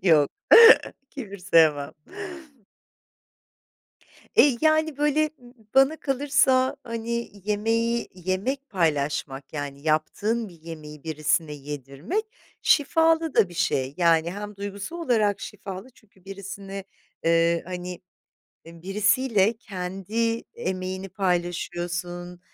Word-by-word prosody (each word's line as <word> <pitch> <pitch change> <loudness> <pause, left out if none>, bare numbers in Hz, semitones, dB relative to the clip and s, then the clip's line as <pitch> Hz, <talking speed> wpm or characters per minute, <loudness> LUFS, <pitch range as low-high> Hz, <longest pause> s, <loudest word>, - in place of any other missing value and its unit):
Yok, 155 -6 +4 0.8
kibir 205 -8 -8
sevmem. 160 -6 +3 2.4
Eee, 275 -5 +6
yani, 315 -1 +2
böyle, 300 +1 +2 0.4
bana 270 +4 +5
kalırsa, 270 -2 +2
hani, 235 0 -4
yemeği, 225 +3 0
yemek 190 +10 -3
paylaşmak, 145 -6 -1
yani, 145 -2 -5
yaptığın 200 +9 0
bir 170 -3 -17
yemeği 155 -2 -10
birisine 155 0 0
yedirmek 145 - -4 0.4
şifalı 325 +1 +3
da 195 - +4
bir 175 - -12
şey. 140 -7 0
Yani, 170 -2 +3
hem 205 +1 -7
duygusal 200 - -6
olarak 225 - +1
şifalı 200 +2 -8
çünkü 200 -5 -25
birisini, 195 0 -7 0.4
ııı, 165 0 +3
hani, 180 0 -6 0.7
birisiyle 205 +6 +1
kendi 205 +3 -3
emeğini 185 +1 -4
paylaşıyorsun, 175 -1 -3
190 Hz, 95 wpm, -25 LUFS, 165-230 Hz, 2.4 s, Eee